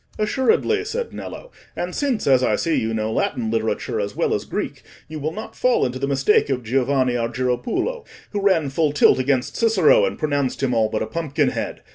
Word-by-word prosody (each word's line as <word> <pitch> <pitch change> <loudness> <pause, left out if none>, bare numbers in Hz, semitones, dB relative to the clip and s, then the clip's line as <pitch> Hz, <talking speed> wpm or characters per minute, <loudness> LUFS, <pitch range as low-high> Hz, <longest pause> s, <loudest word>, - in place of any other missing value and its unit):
"Assuredly," 345 - +1
said 460 +3 -4
Nello. - - -8 0.2
"And 180 +1 -4
since, 275 -6 -1
as 130 -2 +4
I - - +2
see, 165 - -1
you 110 - 0
know 110 0 -2
Latin 110 -1 -1
literature 110 -1 -1
as - - -3
well - - 0
as - - -2
Greek, - - -4 0.3
you 155 0 -7
will 155 +2 -2
not 215 +6 -8
fall 250 -1 +2
into 130 0 -3
the 140 - -1
mistake 140 +5 +2
of 130 -2 -1
Giovanni 130 +2 +1
Argiropulo, 125 - -1 0.3
who 205 - -2
ran 180 -8 +2
full 150 0 +1
tilt 150 - +5
against 130 -1 0
Cicero, 220 -8 +4
and - - -3
pronounced 145 -3 -1
him 130 -2 +1
all 110 -2 +2
but 110 - -1
a - - -2
pumpkin 155 +4 -1
head. - - -5
140 Hz, 200 wpm, -22 LUFS, 125-200 Hz, 0.3 s, tilt